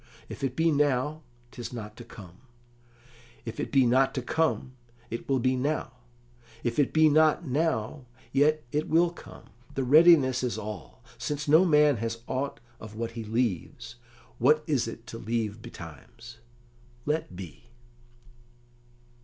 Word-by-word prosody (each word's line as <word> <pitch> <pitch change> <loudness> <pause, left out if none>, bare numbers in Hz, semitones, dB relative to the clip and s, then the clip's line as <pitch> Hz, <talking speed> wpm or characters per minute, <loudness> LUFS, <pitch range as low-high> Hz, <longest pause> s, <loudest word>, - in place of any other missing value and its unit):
If - - -8
it 130 -2 -1
be 165 0 +3
now, 145 +1 +1 0.3
'tis 120 -2 -7
not 105 -3 -7
to 120 - -9
come; 95 -6 -13 1.1
if 115 - -6
it - - -3
be 135 -2 +4
not 130 +3 +3
to 130 - -2
come, 160 -3 0 0.4
it 115 - -6
will 135 - +3
be 130 +1 +1
now; 145 +5 -1 0.7
if 120 +3 -1
it 145 - +3
be 155 0 +5
not 155 +2 +3
now, 135 -3 -1 0.2
yet 150 +3 +3
it 150 +1 -1
will 170 +2 +3
come; 95 - -14 0.2
the 135 - 0
readiness 145 -2 +6
is 125 -2 -2
all: 105 +4 -8 0.2
since 145 0 -3
no 160 +5 +6
man 150 -5 +4
has 115 +1 -4
aught 140 +2 -3 0.2
of 110 -1 -10
what 115 +1 -4
he 115 -1 -6
leaves, 110 - -3 0.4
what 150 +5 +4
is 135 -7 0
it 115 0 -8
to 115 0 -8
leave 110 -1 -3
betimes? 120 +2 -11 0.7
Let 150 - -2
be." 90 -8 -10
130 Hz, 150 wpm, -28 LUFS, 115-150 Hz, 1.1 s, readiness